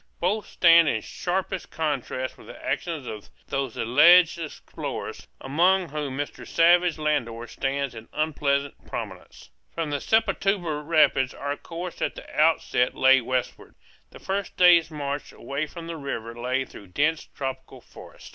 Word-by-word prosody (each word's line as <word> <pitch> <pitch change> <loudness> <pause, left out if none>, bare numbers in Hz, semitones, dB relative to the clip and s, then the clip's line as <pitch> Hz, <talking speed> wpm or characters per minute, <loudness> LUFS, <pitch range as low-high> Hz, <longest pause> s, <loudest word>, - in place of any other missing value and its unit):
Both 205 +5 0
stand 170 -2 +6
in 110 - -1
sharpest 185 +1 -3
contrast 135 -4 -3
with - - -16
the - - -11
actions 160 -6 -2
of 105 -3 -8 0.2
those 135 -4 -2
alleged 170 +8 +6
explorers, 160 -3 -6
among 175 +6 +2
whom 145 -2 -4
Mr. 145 0 -5
Savage 175 0 +4
Landor 120 -7 -1
stands 135 +2 -2
in 115 -1 -11
unpleasant 140 -2 -1
prominence. - - -8 0.2
From 165 -3 -2
the 145 - -2
Sepotuba 195 -8 +1
rapids 145 -4 +3
our 145 0 -3
course 170 +3 -7
at - - -1
the - - -10
outset 150 -5 +2
lay 130 0 +5
westward. 125 +1 -3 0.3
The - - -13
first 195 0 -4
day's 175 -2 +6
march 145 -2 -4
away 145 +3 -4
from 165 +3 -9
the 165 0 -6
river 115 -6 -5
lay 130 +2 -1
through 100 - -13
dense 150 - 0
tropical 135 -1 -6
forest. - - -14
150 Hz, 145 wpm, -25 LUFS, 135-170 Hz, 0.3 s, stand